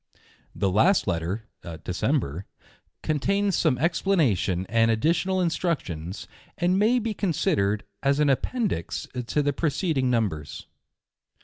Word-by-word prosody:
The 100 -2 0
last 175 - +4
Letter 90 +4 -2 0.4
(December) 90 - -1 0.6
contains 195 +6 +1
some 150 -7 +2
explana 165 - +2
(isuo 95 -1 -1
and 115 +1 +3
additional 170 - +1
instructions, 105 - -2 0.3
and 180 +2 +2
may 225 +4 +4
be 225 -2 -1
considered 105 - 0 0.2
as 140 +1 +2
an 150 - +3
Appendix 200 - -2 0.2
to 150 - +1
the 145 0 +1
preceding 150 -2 0
numbers. 100 - -2
140 Hz, 115 wpm, -25 LUFS, -, 0.6 s, last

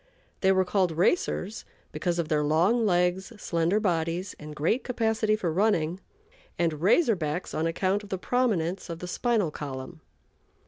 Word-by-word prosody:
They 190 - +4
were 190 -1 +3
called 185 -1 +1
"racers" 205 - 0 0.3
because 175 -1 -1
of 170 -2 -1
their 150 -1 +1
long 180 +10 +3
legs, 180 +1 +1
slender 170 0 0
bodies, 175 -1 -1
and 150 0 -9
great 165 - 0
capacity 220 -3 +1
for 180 -7 -2
running; 180 -3 +1 0.6
and 165 -3 0
"Razor 225 - +4
Backs" 155 +1 -3
on 160 +1 0
account 190 +4 0
of 205 - -13
the 190 - -2
prominence 190 -6 0
of 165 - -4
the 180 - -7
spinal 215 -3 0
column. 140 +2 -7
180 Hz, 155 wpm, -27 LUFS, 165-210 Hz, 0.6 s, They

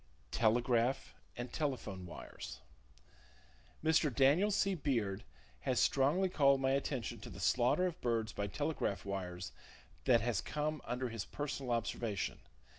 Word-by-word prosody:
Telegraph 120 +2 +2 0.2
And 120 0 -5
Telephone 125 - -2
Wires. - - -8 1.2
—Mr. 160 -2 +4
Daniel 140 - +4
C. 195 -1 +2
Beard 115 - -1 0.4
has - - 0
strongly 145 +8 +3
called 140 -6 +4
my 135 0 +2
attention 135 -2 -1
to - - -9
the - - -9
slaughter 125 +9 +3
of 180 -3 -3
birds 115 -2 0
by 100 - -2
telegraph 145 - -2
wires 90 -4 -4 0.5
that 120 -2 +5
has 110 -6 0
come 150 - -2
under 125 0 -2
his 115 -3 -4
personal 140 -3 -4
observation. 115 -3 -1
125 Hz, 130 wpm, -35 LUFS, 110-145 Hz, 1.2 s, that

